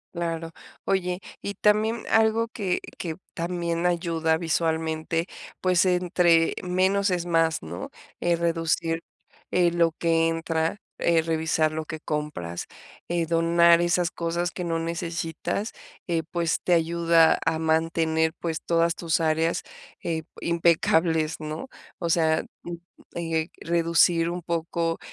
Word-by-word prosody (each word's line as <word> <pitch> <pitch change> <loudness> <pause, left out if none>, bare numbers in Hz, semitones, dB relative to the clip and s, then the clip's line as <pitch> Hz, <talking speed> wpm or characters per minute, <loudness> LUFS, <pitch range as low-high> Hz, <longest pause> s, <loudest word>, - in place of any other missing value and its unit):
Claro. 165 -1 -3 0.3
Oye, 180 -1 0 0.2
y 200 - -4
también 215 +3 +2
algo 225 +1 +3
que 200 -6 -2 0.2
que 165 -3 -3 0.2
también 170 0 -1
ayuda 165 -2 +1
visualmente, 160 0 -1 0.3
pues 185 0 +3
entre 180 -2 +3
menos 190 +3 +2
es 175 -2 -1
más, 165 -2 +1
¿no?, 85 +2 -6 0.3
eh, 175 0 +2
reducir, 165 -1 0 0.5
eh, 175 -1 +3
lo 170 -1 +3
que 165 -1 +2
entra, 165 +1 -1 0.2
eh, 165 -1 +3
revisar 160 -1 +1
lo 155 0 -4
que 155 0 -6
compras, 150 - -4 0.4
eh, 170 -1 0
donar 170 +1 +4
esas 175 0 +1
cosas 170 +1 -2
que 180 - -5
no 165 -1 -1
necesitas, 165 +4 -3 0.3
eh, 170 -2 0
pues 170 -1 0
te 180 - +2
ayuda 165 0 +4
a 165 -1 +1
mantener, 160 0 +1
pues, 165 -2 -3
todas 170 0 +2
tus 165 -1 0
áreas, 160 +1 +1 0.4
eh, 160 -1 -1 0.2
impecables, 165 -1 +2
¿no?, 155 +10 -6 0.3
o 170 -2 -1
sea, 160 -1 +2 0.2
mm, 175 - -6 0.4
eh, 165 -1 -1
reducir 170 0 +3
un 175 +1 -4
poco, 165 0 -1
165 Hz, 130 wpm, -25 LUFS, 160-175 Hz, 0.5 s, donar